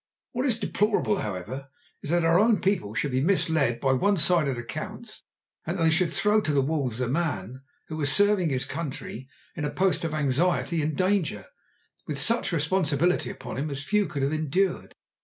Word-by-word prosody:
What 255 +2 -1
is 235 -4 +2
deplorable, 210 -2 0
however, 105 - -5 0.3
is - - -7
that 170 0 +2
our 165 +2 +4
own 220 +1 +4
people 180 - -1
should 135 +5 -1
be 130 +1 +1
misled 160 -8 +2
by 135 +1 +2
one 200 +9 +2
sided 155 -5 +2
accounts, 120 0 -7 0.4
and 170 +4 -3
that 165 - 0
they 160 - +4
should 165 0 +1
throw 210 +4 +2
to 155 - -1
the 140 -1 +3
wolves 135 -5 -2
a 125 - 0
man 130 - -2 0.3
who 155 - -6
was 145 -3 +3
serving 205 -2 +4
his 130 -2 -1
country 135 -5 -6 0.3
in 155 - -4
a 145 - 0
post 180 -1 +1
of 160 -2 -2
anxiety 160 +4 +1
and 150 -1 -2
danger, 185 - 0 0.6
with 150 - -3
such 230 +12 +4
responsibility 165 0 +1
upon - - -7
him 150 +3 -2
as 140 0 -5
few 210 +4 +1
could 140 -2 -3
ever 140 - +1
have 155 - -1
endured. 180 +5 -1
155 Hz, 195 wpm, -26 LUFS, 135-185 Hz, 0.6 s, our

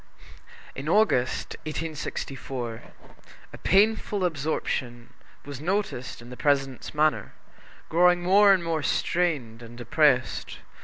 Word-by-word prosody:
In 140 +3 -5
August, 175 - +1
1864, 135 -6 -5 0.7
a - - -8
painful 205 0 +2
absorption 135 -6 -3 0.3
was 140 -1 -8
noticed 175 - -3
in 120 - -12
the - - -7
President's 135 -1 -1
manner, 150 -8 +1 0.5
growing 175 +1 +3
more 200 +3 +6
and 190 -3 +3
more 165 -2 -1
strained 145 -9 -1
and 120 0 -11
depressed. 130 +2 +1
150 Hz, 105 wpm, -26 LUFS, 125-175 Hz, 0.7 s, more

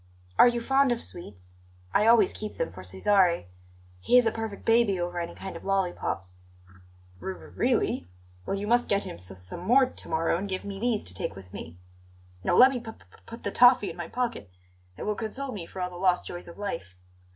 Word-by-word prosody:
"Are - - +10
you 240 0 +1
fond 270 +2 +3
of 235 - -1
sweets? 90 - -6 0.4
I 210 - +4
always 225 -4 +6
keep 215 -1 -6
them - - -2
for 90 +1 -10
Cesare; 170 - +2 0.5
he 245 - +4
is 250 - +6
a 225 - +3
perfect 225 -2 -6
baby 225 -4 +3
over 175 0 -2
any 170 - -5
kind 190 - -7
of - - -9
lollipops." 175 - -2 0.8
"R 95 +2 -4
r 80 - -13
really? - - 0 0.4
Well, 195 - -1
you 200 - -3
must 240 +3 +2
get 200 0 +2
him - - -7
s 90 +1 -7
some 90 - -6
more 245 +9 +5
to 255 - -8
morrow 165 +1 +1
and 200 +1 -4
give 185 0 -3
me 200 -1 -6
these 235 -1 0
to 90 - -4
take 95 - -4
with 95 -1 -12
me. 80 +2 -8 0.7
No, 175 - +2
let 260 +2 +9
me 255 - -2
p 230 -1 -8
p - - -22 0.2
put 230 +1 -10
the - - -2
toffee 245 -4 +6
in - - -11
my 175 -2 -5
pocket; 240 - -3 0.5
it - - -6
will 210 - 0
console 245 +6 -4
me 180 -7 -6
for 190 - -9
all 180 0 -2
the 175 - -9
lost 180 -1 +2
joys 175 0 -7
of 170 - -11
life. 95 - -5
195 Hz, 220 wpm, -27 LUFS, 165-230 Hz, 0.8 s, Are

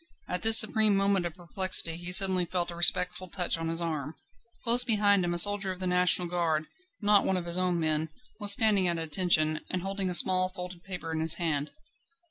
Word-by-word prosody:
At 180 0 -5
this 225 0 +8
supreme 215 -2 +3
moment 195 -2 -1
of 170 - -12
perplexity 180 -2 -3
he 175 +1 -7
suddenly 185 -1 +4
felt 175 0 -5
a - - -10
respectful 180 +2 +1
touch 180 0 -4
on 165 0 -6
his 165 0 -3
arm. 155 -3 -6 0.5
Close 240 +1 +5
behind 205 -4 0
him 175 - -3
a 175 - -4
soldier 205 +2 +1
of 185 - -10
the 185 - -6
National 180 0 +2
Guard 165 -3 -3 0.4
not 205 0 +2
one 190 - 0
of 175 - -6
his 170 +1 -1
own 180 -2 -1
men 155 0 -2 0.3
was 205 -1 +2
standing 205 -3 +3
at 170 -1 -2
attention, 155 -1 0
and 180 -1 -5
holding 195 -1 -5
a 180 - +1
small, 185 +1 +3
folded 180 -2 -11
paper 180 -4 -9
in 160 - -5
his 160 0 +5
hand. 155 -4 -4
180 Hz, 210 wpm, -26 LUFS, 170-195 Hz, 0.5 s, this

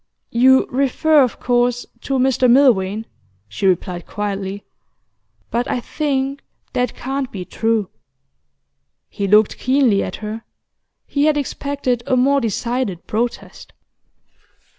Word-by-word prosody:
'You 260 +3 +5
refer, 280 +4 +3
of 250 -3 0
course, 245 0 +1 0.2
to 275 - -1
Mr 255 -1 +3
Milvain,' 225 -5 +3 0.4
she 105 - -2
replied 180 -1 -1
quietly. 200 -1 -4 0.9
'But 240 +1 0
I - - 0
think 275 +1 -2 0.3
that 250 0 -1
can't 270 0 -3
be 185 -3 -6
true.' 225 -1 0 1.2
He 200 - -3
looked 210 +1 +4
keenly 255 -6 +3
at - - -4
her. 220 +1 -6 0.6
He 285 0 0
had 305 -1 +3
expected 280 -3 -2
a 255 - +2
more 275 +2 +3
decided 230 -3 -2
protest. 235 +2 -4
245 Hz, 120 wpm, -19 LUFS, 210-270 Hz, 1.2 s, You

